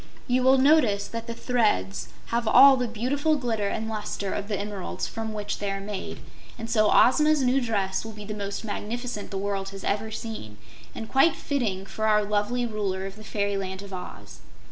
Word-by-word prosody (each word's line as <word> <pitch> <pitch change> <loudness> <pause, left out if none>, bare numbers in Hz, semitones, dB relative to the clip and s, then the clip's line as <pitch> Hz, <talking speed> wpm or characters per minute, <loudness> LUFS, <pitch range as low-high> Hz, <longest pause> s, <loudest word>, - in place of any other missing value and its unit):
You 255 0 +2
will 260 +1 +5
notice 260 -8 +4
that 230 0 -6
the 230 - -5
threads 215 - 0 0.3
have 235 -1 +1
all 270 +4 +8
the 250 -1 -1
beautiful 275 +8 0
glitter 230 -7 -1
and 220 +2 -2
luster 210 -2 -3
of 200 - -3
the 205 -3 -2
emeralds 200 -2 -4
from 225 -1 -4
which 210 -1 -4
they 205 - -2
are 195 0 -2
made, 200 -1 -6 0.4
and 230 -1 -6
so 215 -2 +3
Ozma's 300 +3 +5
new 255 +2 +3
dress 200 -5 -1
will 225 - -7
be 210 -1 -9
the 210 - -5
most 200 +1 -4
magnificent 225 +1 -4
the 195 - -4
world 195 0 -2
has 195 0 -9
ever 210 +2 -1
seen, 215 - -7 0.4
and 225 - -6
quite 270 +8 +4
fitting 215 -10 -2
for 220 +2 -2
our 210 -1 +4
lovely 210 +4 0
Ruler 200 -4 -2
of 195 0 -7
the 215 - -12
Fairyland 200 -2 -2
of 200 -1 -10
Oz." 105 - -8
215 Hz, 195 wpm, -26 LUFS, 200-240 Hz, 0.4 s, all